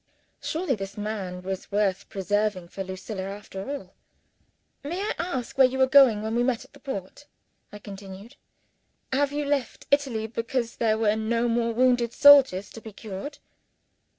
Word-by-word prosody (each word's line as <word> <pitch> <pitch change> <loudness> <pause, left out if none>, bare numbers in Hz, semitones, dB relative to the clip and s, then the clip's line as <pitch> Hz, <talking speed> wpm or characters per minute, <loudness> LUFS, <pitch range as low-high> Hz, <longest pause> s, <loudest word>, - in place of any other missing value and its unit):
Surely 325 -2 -1
this 195 -3 -6
man 200 -4 -4
was 190 +1 -5
worth 200 -2 0
preserving 205 -1 -1
for 195 +3 -6
Lucilla, 190 +2 -6
after 195 +1 -7
all! 275 -10 -6 0.9
"May 335 +6 -4
I 415 +2 -1
ask 275 -7 -4
where 260 - +8
you 260 +1 -4
were 265 - +5
going, 260 -6 +6
when 220 +1 -2
we 240 - +2
met 245 -2 0
at - - -24
the - - -16
port?" 265 +1 -7 0.4
I 210 - -8
continued. 200 +3 -10 0.8
"Have 280 +1 +2
you 295 0 -2
left 280 -4 -2
Italy 265 -6 +1
because 230 +1 -3
there 220 -2 +2
were 215 -1 +2
no 230 +2 0
more 235 0 +1
wounded 245 0 +2
soldiers 270 -9 +6
to 225 - -10
be 220 - -9
cured?" 215 +8 -7
225 Hz, 165 wpm, -26 LUFS, 200-265 Hz, 0.9 s, where